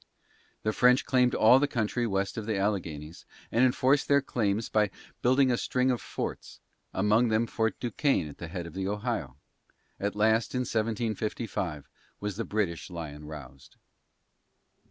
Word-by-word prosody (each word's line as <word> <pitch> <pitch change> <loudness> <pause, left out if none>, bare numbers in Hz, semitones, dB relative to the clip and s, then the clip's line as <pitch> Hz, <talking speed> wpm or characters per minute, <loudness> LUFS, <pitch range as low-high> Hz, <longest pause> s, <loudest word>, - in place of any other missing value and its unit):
The 110 - 0
French 125 +3 +4
claimed 125 -2 +3
all 125 +4 +7
the 145 - +2
country 120 -1 -1
west 95 -1 -1
of 110 -1 -5
the 110 -3 0
Alleghanies 85 -6 -3 0.3
and 115 - +3
enforced 130 +2 +3
their 140 0 +5
claims 110 -5 -1
by 105 -1 +2 0.3
building 130 +1 +4
a 120 - +2
string 130 +2 +1
of 125 - -2
forts, - - -5 0.3
among 105 +5 +3
them 110 +1 +2
Fort 110 -2 -1
Duquesne 125 - +1
at 75 - -11
the 85 - -6
head 85 +1 -5
of 85 - -9
the 95 0 -3
Ohio. 105 - -3 0.6
At 100 0 -2
last, 110 +3 +2
in 125 - +1
1755, 110 - -2 0.3
was 105 -2 -3
"the 115 - -2
British 100 -6 -2
Lyon 75 -4 -7
roused." 70 -3 -11
110 Hz, 155 wpm, -29 LUFS, 95-120 Hz, 0.6 s, all